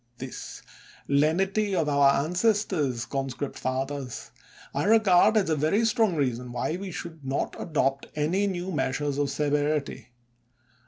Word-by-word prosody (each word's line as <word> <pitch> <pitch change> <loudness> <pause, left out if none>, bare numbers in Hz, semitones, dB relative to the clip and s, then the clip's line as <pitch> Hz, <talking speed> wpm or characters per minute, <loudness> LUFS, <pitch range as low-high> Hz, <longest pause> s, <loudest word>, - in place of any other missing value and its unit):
This 130 0 -8 0.4
lenity 190 +8 +2
of 165 -4 +1
our 140 -1 +5 0.2
ances 205 +5 +2
tors, 135 - -1
conscript 135 +1 -4
fathers, 130 0 -4 0.4
I - - -1
regard 215 -1 +5
as 205 - +2
a - - +3
very 160 +10 +2
strong 220 -4 +2
reason 125 -4 -1
why 125 +6 -2
we 195 0 -6
should 165 -3 -8
not 135 +1 -2
adopt 135 -4 0
any 170 +7 +1
new 185 -1 -3
meas 130 -6 -1
ures 145 -1 -2
of 145 -1 +1
severity. 145 -3 -1
150 Hz, 145 wpm, -26 LUFS, 135-190 Hz, 0.4 s, our